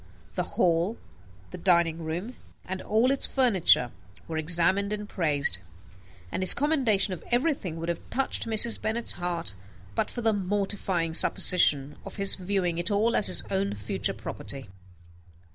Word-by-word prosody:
The - - -2 0.2
hall, 175 +5 +1 0.5
the - - -9
dining 170 -2 +1
room, 175 +10 -5 0.3
and 190 +1 -6
all 225 +5 +1
its 275 - +5
furniture, 195 - +3 0.4
were 160 -1 -4
examined 180 +5 0
and 210 0 -5
praised; 145 - 0 0.7
and - - -3
his 185 - +10
commendation 260 -10 +1
of 180 - -9
everything 240 - -1
would 165 +1 -6
have 170 - -6
touched 265 -2 -2
Mrs. 225 +1 +3
Bennet's 225 +2 -2
heart, 170 - -3 0.4
but - - -2
for 240 - -6
the 225 -1 +1
mortifying 190 -4 -2
supposition 150 -5 +3
of - - -10
his 195 -1 0
viewing 180 -3 -2
it 175 +4 +1
all 220 +3 +1
as 205 - +6
his - - +2
own 195 - -1
future 100 0 -3
property. 135 -6 -7
190 Hz, 150 wpm, -26 LUFS, 165-220 Hz, 0.7 s, his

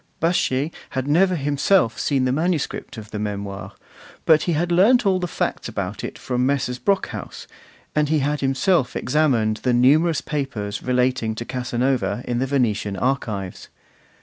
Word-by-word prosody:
Baschet 160 -3 +1 0.2
had 130 0 -3
never 180 +5 +3
himself 145 - +2
seen 135 -3 +1
the 125 - +1
manuscript 155 -4 -2
of 110 -1 -9
the 105 - -4
Memoirs, 100 -2 -5 0.5
but 155 -1 +5
he 175 - 0
had 170 +3 0
learnt 210 +8 +5
all 190 -2 +3
the 180 - -2
facts 160 - -3
about 100 -2 -4
it - - -5
from 125 -1 -2
Messrs. 130 -2 0
Brockhaus, 200 -1 -2 0.5
and 150 -1 +1
he 155 - +3
had 145 +1 0
himself 135 +2 +1
examined 125 -6 +1
the 125 +2 0
numerous 150 +6 +4
papers 120 -9 -4
relating 125 -3 0
to 120 - -5
Casanova 125 0 -1
in 120 -1 -1
the 135 - 0
Venetian 110 -7 0
archives. 110 -8 -2
130 Hz, 155 wpm, -22 LUFS, 120-155 Hz, 0.5 s, but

